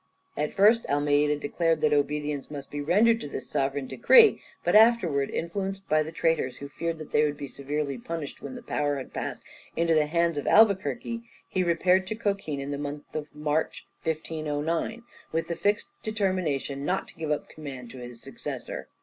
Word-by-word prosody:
At 150 Hz, +1 st, -2 dB
first 215 Hz, +4 st, +5 dB
Almeida 145 Hz, +1 st, +2 dB
declared 165 Hz, +2 st, 0 dB
that 150 Hz, -1 st, +3 dB
obedience 145 Hz, 0 st, 0 dB
must 140 Hz, -2 st, -8 dB
be 145 Hz, -, -3 dB
rendered 215 Hz, +9 st, +4 dB
to -, -, -5 dB
this -, -, -6 dB
sovereign 135 Hz, 0 st, -1 dB
decree, 450 Hz, -, +6 dB, 0.2 s
but -, -, +2 dB
afterwards 210 Hz, -11 st, +5 dB
influenced 195 Hz, +3 st, -3 dB
by 155 Hz, 0 st, +3 dB
the 155 Hz, +1 st, -4 dB
traitors, 160 Hz, -6 st, 0 dB
who 140 Hz, -, -7 dB
feared 165 Hz, +3 st, -3 dB
that 155 Hz, -1 st, -9 dB
they 150 Hz, -, +4 dB
would 145 Hz, -1 st, 0 dB
be 145 Hz, -, -5 dB
severely 140 Hz, 0 st, -3 dB
punished 160 Hz, +2 st, -6 dB
when 260 Hz, -, -7 dB
the 245 Hz, -, -9 dB
power 145 Hz, -10 st, 0 dB
had 135 Hz, -2 st, -7 dB
passed -, -, -4 dB, 0.3 s
into 165 Hz, 0 st, +2 dB
the 155 Hz, -1 st, +3 dB
hands 170 Hz, -1 st, +1 dB
of -, -, -6 dB
Albuquerque, 220 Hz, +2 st, +3 dB, 0.3 s
he 185 Hz, -, 0 dB
repaired 180 Hz, +2 st, +3 dB
to 215 Hz, -, -3 dB
Cochin 195 Hz, -9 st, -2 dB
in 140 Hz, +1 st, -4 dB
the 140 Hz, -, -3 dB
month 145 Hz, 0 st, -6 dB
of 150 Hz, -1 st, -3 dB
March, 150 Hz, +1 st, -1 dB, 0.2 s
1509, 160 Hz, +6 st, -2 dB, 0.3 s
with 165 Hz, +1 st, -1 dB
the 170 Hz, -, -1 dB
fixed 205 Hz, +4 st, 0 dB
determination 185 Hz, -, -1 dB
not 185 Hz, +6 st, -1 dB
to -, -, -14 dB
give 160 Hz, -2 st, -4 dB
up 150 Hz, -, -1 dB
the -, -, -16 dB
command 130 Hz, -6 st, -8 dB
to 130 Hz, -, -10 dB
his 120 Hz, -1 st, -9 dB
successor. -, -, -6 dB
155 Hz, 190 wpm, -27 LUFS, 145-185 Hz, 0.3 s, decree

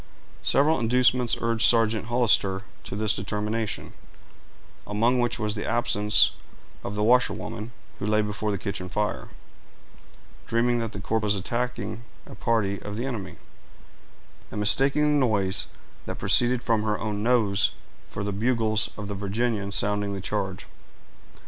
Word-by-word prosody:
Several 150 Hz, +1 st, +3 dB
inducements 125 Hz, +1 st, +2 dB
urged 115 Hz, -1 st, +1 dB
Sergeant 110 Hz, -2 st, +3 dB
Hollister 105 Hz, -5 st, +2 dB, 0.2 s
to -, -, -5 dB
this 110 Hz, 0 st, +2 dB
determination, 105 Hz, +3 st, -3 dB, 0.9 s
among 115 Hz, +5 st, +2 dB
which 120 Hz, -1 st, 0 dB
was 105 Hz, -2 st, -1 dB
the 105 Hz, -, -4 dB
absence 105 Hz, -3 st, +3 dB, 0.5 s
of 100 Hz, -, -5 dB
the 105 Hz, -, 0 dB
washerwoman, 120 Hz, -1 st, +1 dB, 0.3 s
who 100 Hz, -, -3 dB
lay 105 Hz, 0 st, +2 dB
before 105 Hz, +1 st, -3 dB
the 100 Hz, -, 0 dB
kitchen 95 Hz, -2 st, -5 dB
fire, 105 Hz, +3 st, -2 dB, 1.2 s
dreaming 120 Hz, +1 st, +1 dB
that 115 Hz, -1 st, -4 dB
the -, -, -6 dB
corps 110 Hz, +2 st, -1 dB
was 105 Hz, -1 st, +1 dB
attacking 120 Hz, +3 st, -3 dB, 0.2 s
a -, -, -11 dB
party 105 Hz, -4 st, 0 dB
of 105 Hz, 0 st, -6 dB
the 120 Hz, -, -2 dB
enemy, 115 Hz, -8 st, -5 dB, 1.1 s
and 105 Hz, -, -5 dB
mistaking 135 Hz, +8 st, +3 dB
the 150 Hz, -1 st, +3 dB
noise 100 Hz, -4 st, +1 dB, 0.4 s
that -, -, -4 dB
proceeded 125 Hz, 0 st, +3 dB
from 115 Hz, -2 st, +1 dB
her 105 Hz, -1 st, 0 dB
own 105 Hz, -2 st, -3 dB
nose 105 Hz, -5 st, +2 dB, 0.4 s
for 100 Hz, -, -5 dB
the 100 Hz, -, -2 dB
bugles 110 Hz, 0 st, +1 dB
of 100 Hz, -1 st, -5 dB
the 100 Hz, -, -4 dB
Virginians 100 Hz, +1 st, -2 dB
sounding 105 Hz, 0 st, 0 dB
the -, -, -4 dB
charge. -, -, -3 dB
110 Hz, 145 wpm, -26 LUFS, 105-120 Hz, 1.2 s, Several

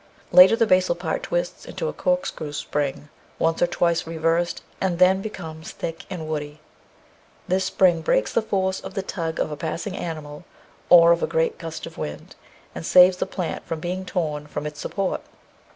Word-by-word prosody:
Later 185 Hz, +4 st, +9 dB
the 230 Hz, -, +3 dB
basal 185 Hz, -3 st, +3 dB
part 180 Hz, -, -3 dB
twists -, -, -3 dB
into -, -, -4 dB
a -, -, -3 dB
corkscrew 270 Hz, -, -2 dB
spring 145 Hz, 0 st, -3 dB, 0.3 s
once 165 Hz, 0 st, 0 dB
or 175 Hz, -, +5 dB
twice 170 Hz, -1 st, 0 dB
reversed, 165 Hz, +1 st, 0 dB, 0.2 s
and 185 Hz, -3 st, 0 dB
then 185 Hz, +2 st, +5 dB
becomes 160 Hz, -7 st, -7 dB
thick 165 Hz, 0 st, -6 dB
and 170 Hz, -5 st, -5 dB
woody. 150 Hz, -1 st, -4 dB, 0.9 s
This 185 Hz, +1 st, +1 dB
spring 175 Hz, -3 st, +3 dB
breaks 105 Hz, -8 st, +1 dB
the -, -, +3 dB
force 190 Hz, -3 st, -1 dB
of 190 Hz, -, -9 dB
the 195 Hz, -, -2 dB
tug 165 Hz, -4 st, -4 dB
of -, -, -1 dB
a -, -, -3 dB
passing 185 Hz, +6 st, -4 dB
animal 155 Hz, -3 st, -6 dB, 0.5 s
or 170 Hz, -1 st, +8 dB
of 170 Hz, -, +3 dB
a -, -, +1 dB, 0.2 s
gust 165 Hz, -, -7 dB
of 165 Hz, -, -10 dB
wind, 75 Hz, 0 st, -6 dB, 0.4 s
and 80 Hz, -, -6 dB
saves 180 Hz, -, +6 dB
the -, -, -2 dB
plant 180 Hz, -4 st, -4 dB
from 165 Hz, -, -3 dB
being 180 Hz, +3 st, -3 dB
torn 155 Hz, -5 st, -3 dB
from 150 Hz, 0 st, -5 dB
its 150 Hz, 0 st, -6 dB
support. 195 Hz, +3 st, -2 dB
170 Hz, 180 wpm, -23 LUFS, 155-190 Hz, 0.9 s, Later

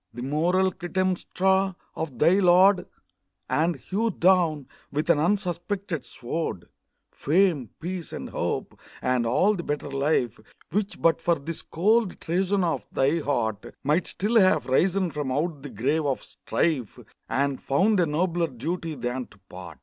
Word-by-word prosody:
The 120 Hz, -, -5 dB
moral 175 Hz, +7 st, +2 dB
Clytemnestra 185 Hz, +1 st, 0 dB, 0.2 s
of 150 Hz, -6 st, -4 dB
thy 170 Hz, +9 st, +4 dB
lord, 185 Hz, +1 st, +5 dB, 0.6 s
And 165 Hz, +2 st, +1 dB
hewed 200 Hz, -, -2 dB
down, 170 Hz, -6 st, +3 dB, 0.3 s
with 150 Hz, +4 st, +1 dB
an 155 Hz, -, +2 dB
unsuspected 185 Hz, -1 st, -1 dB
sword, 120 Hz, -, -4 dB, 0.5 s
Fame, 160 Hz, -, +1 dB
peace, 175 Hz, 0 st, -5 dB
and -, -, -6 dB
hope -, -, -3 dB, 0.2 s
and 125 Hz, -2 st, +1 dB
all 185 Hz, -, +3 dB
the 185 Hz, -, -3 dB
better 145 Hz, -3 st, -4 dB
life 135 Hz, -4 st, 0 dB, 0.3 s
Which, 205 Hz, +3 st, -2 dB
but 165 Hz, 0 st, +3 dB
for 170 Hz, 0 st, +2 dB
this 160 Hz, +2 st, -6 dB
cold 210 Hz, +4 st, +1 dB
treason 190 Hz, +3 st, 0 dB
of 150 Hz, -10 st, -1 dB
thy 140 Hz, +5 st, +2 dB
heart, 115 Hz, -8 st, -2 dB
Might 155 Hz, +5 st, +1 dB
still 225 Hz, +4 st, +2 dB
have 185 Hz, -2 st, +4 dB
risen 180 Hz, +6 st, +2 dB
from 145 Hz, -3 st, -3 dB
out 150 Hz, +2 st, -1 dB
the 145 Hz, -, -7 dB
grave 140 Hz, +7 st, 0 dB
of 135 Hz, -, -1 dB
strife, 135 Hz, -10 st, -2 dB, 0.3 s
And 140 Hz, 0 st, 0 dB
found 190 Hz, +9 st, +2 dB
a 175 Hz, -, +3 dB
nobler 170 Hz, +2 st, 0 dB
duty 160 Hz, +5 st, -4 dB
than 125 Hz, 0 st, -3 dB
to 105 Hz, -, -20 dB
part. 90 Hz, -3 st, -10 dB
165 Hz, 150 wpm, -26 LUFS, 140-185 Hz, 0.6 s, lord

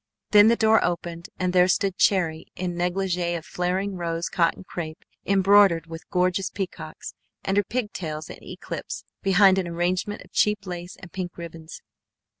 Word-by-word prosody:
Then 205 Hz, 0 st, +8 dB
the 230 Hz, -, +5 dB
door 220 Hz, -1 st, +4 dB
opened 170 Hz, -1 st, -3 dB
and 180 Hz, -1 st, -1 dB
there 180 Hz, 0 st, +5 dB
stood 190 Hz, +1 st, +1 dB
Cherry 170 Hz, -6 st, +2 dB
in 180 Hz, -1 st, -3 dB
negligée 175 Hz, -1 st, -1 dB
of 160 Hz, -, -9 dB
flaring 185 Hz, +2 st, -2 dB
rosy 170 Hz, -1 st, -2 dB
cotton 170 Hz, +1 st, +1 dB
crêpe 160 Hz, -4 st, -6 dB, 0.3 s
embroidered 195 Hz, -3 st, +5 dB
with 165 Hz, 0 st, -10 dB
gorgeous 180 Hz, +1 st, +1 dB
peacocks, 190 Hz, -2 st, -6 dB, 0.3 s
and 195 Hz, -, 0 dB
her 205 Hz, -, +4 dB
pigtails 185 Hz, -9 st, -4 dB
in -, -, -11 dB
eclipse -, -, -6 dB, 0.2 s
behind 195 Hz, 0 st, +5 dB
an 185 Hz, -, -2 dB
arrangement 180 Hz, +4 st, -1 dB
of -, -, -21 dB
cheap 210 Hz, -1 st, +1 dB
lace 175 Hz, -1 st, -6 dB
and 180 Hz, -3 st, -12 dB
pink 180 Hz, -2 st, -5 dB
ribbons. 165 Hz, -1 st, -9 dB
180 Hz, 160 wpm, -25 LUFS, 170-195 Hz, 0.3 s, Then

